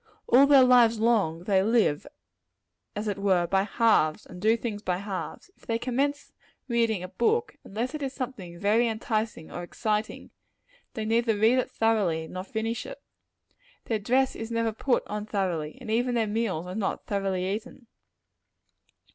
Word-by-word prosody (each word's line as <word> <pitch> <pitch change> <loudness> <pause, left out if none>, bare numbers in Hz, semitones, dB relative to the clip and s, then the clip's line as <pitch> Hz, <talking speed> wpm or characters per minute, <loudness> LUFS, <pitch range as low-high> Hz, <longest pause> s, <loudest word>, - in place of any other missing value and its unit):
All 270 +3 +6
their 280 -2 +7
lives 240 -3 +5
long, 205 -8 +1
they 195 0 +3
live, 215 - +2 0.9
as 210 +1 -3
it 200 -1 -2
were, 190 -3 +2
by 190 +2 +2
halves, 210 -7 +2
and 180 0 -11
do 220 +2 +3
things 220 -3 -4
by 180 -4 -1
halves. 200 - -6
If - - -24
they 230 - 0
commence 265 +4 -2 0.4
reading 230 -6 +1
a - - -5
book, 435 - 0
unless 235 +7 -4
it 305 - -5
is 270 -2 -2
something 245 -11 -6
very 215 +6 +2
enticing 220 -5 -3
and 175 - -5
exciting, 210 +4 -3 0.6
they 220 -3 -3
neither 225 0 +1
read 225 +5 +4
it - - -1
thoroughly 195 -8 +1
nor 185 +3 -6
finish 225 +3 -3
it. - - -9 0.9
Their 220 -2 -1
dress 260 +6 +1
is 225 0 -6
never 230 -1 0
put 245 +3 0
on 210 0 -5
thoroughly; 175 -7 -2
and 240 -4 -6
even 245 +2 +1
their 230 -2 +2
meals 205 -6 -2
are 180 - -6
not 200 -1 -3
thoroughly 195 -2 -1
eaten. 225 +5 -5
220 Hz, 165 wpm, -27 LUFS, 195-235 Hz, 0.9 s, their